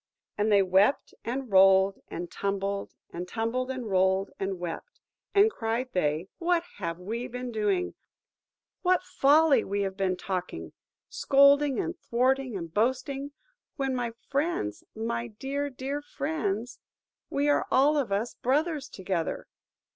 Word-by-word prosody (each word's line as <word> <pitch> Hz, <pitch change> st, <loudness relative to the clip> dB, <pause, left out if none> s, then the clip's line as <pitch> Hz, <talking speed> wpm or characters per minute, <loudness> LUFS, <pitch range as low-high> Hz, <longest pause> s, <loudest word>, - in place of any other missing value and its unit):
And 210 Hz, +1 st, +1 dB
they 200 Hz, -1 st, +6 dB
wept, 190 Hz, +8 st, +2 dB
and 255 Hz, 0 st, -4 dB
rolled, 190 Hz, 0 st, +6 dB
and 175 Hz, 0 st, -6 dB
tumbled, 200 Hz, 0 st, -2 dB, 0.2 s
and 175 Hz, +1 st, -5 dB
tumbled, 230 Hz, +5 st, -2 dB
and 260 Hz, -3 st, -4 dB
rolled, 190 Hz, 0 st, +2 dB
and 195 Hz, -1 st, -2 dB
wept; 175 Hz, -, -6 dB, 0.4 s
and 410 Hz, +2 st, +6 dB
cried 235 Hz, -, -2 dB
they, 155 Hz, 0 st, 0 dB
"What 345 Hz, -1 st, +2 dB
have 170 Hz, -4 st, -3 dB
we 225 Hz, +7 st, -4 dB
been 250 Hz, 0 st, -5 dB
doing? 300 Hz, -, 0 dB, 0.9 s
What 365 Hz, -1 st, +3 dB
folly 295 Hz, -3 st, +4 dB
have -, -, -4 dB
we 200 Hz, 0 st, 0 dB
been 190 Hz, -1 st, -1 dB
talking? 185 Hz, -2 st, -4 dB, 0.3 s
Scolding, 280 Hz, 0 st, +4 dB
and 345 Hz, -2 st, -2 dB
thwarting, 255 Hz, -1 st, +1 dB
and 165 Hz, -3 st, -7 dB
boasting, 270 Hz, +5 st, -1 dB, 0.4 s
when, 270 Hz, -3 st, -1 dB
my 240 Hz, -2 st, -2 dB
friends–my 235 Hz, -, -2 dB
dear, 280 Hz, +3 st, -2 dB
dear 275 Hz, +2 st, -4 dB
friends–we 275 Hz, 0 st, -4 dB
are 290 Hz, -, +2 dB
all 285 Hz, +4 st, +4 dB
of 270 Hz, -8 st, 0 dB
us 210 Hz, +4 st, -1 dB
brothers 290 Hz, +2 st, 0 dB
together!" 185 Hz, -4 st, -3 dB
235 Hz, 130 wpm, -28 LUFS, 195-280 Hz, 0.9 s, they